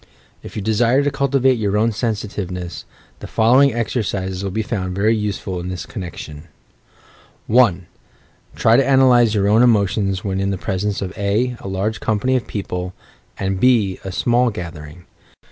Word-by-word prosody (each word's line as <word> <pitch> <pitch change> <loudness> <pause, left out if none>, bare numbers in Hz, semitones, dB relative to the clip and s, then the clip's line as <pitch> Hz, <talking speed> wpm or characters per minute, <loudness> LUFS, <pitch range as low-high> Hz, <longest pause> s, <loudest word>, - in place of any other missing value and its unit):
If - - -11
you 105 - -4
desire 115 +5 +2
to 145 - 0
cultivate 135 -2 +2
your 105 -1 0
own 115 +2 +2
sensitiveness, 100 -5 -4 0.3
the - - -8
following 130 +5 +4
exercises 100 -5 -2
will 100 - -2
be 110 +4 -2
found 95 -4 -3
very 105 +3 +2
useful 100 -3 -3
in 90 +1 -5
this 90 -1 -5
connection; 85 -6 -8 1.0
1. 105 -7 +3 0.7
Try 115 +1 +4
to 135 - +4
analyse 125 -4 +4
your 100 -1 +2
own 110 +3 +4
emotions 100 -4 +2
when 95 -1 -2
in 100 0 0
the 100 - -2
presence 100 +2 -2
of 95 0 -6
(a) 110 +5 0
a - - -8
large 100 +3 -2
company 110 +4 0
of 125 - -1
people, 90 -3 -5 0.4
and 95 -1 -2
(b) 110 -6 +2
a 95 - -5
small 120 +5 +2
gathering. 85 -4 -8
105 Hz, 160 wpm, -19 LUFS, 95-120 Hz, 1.0 s, following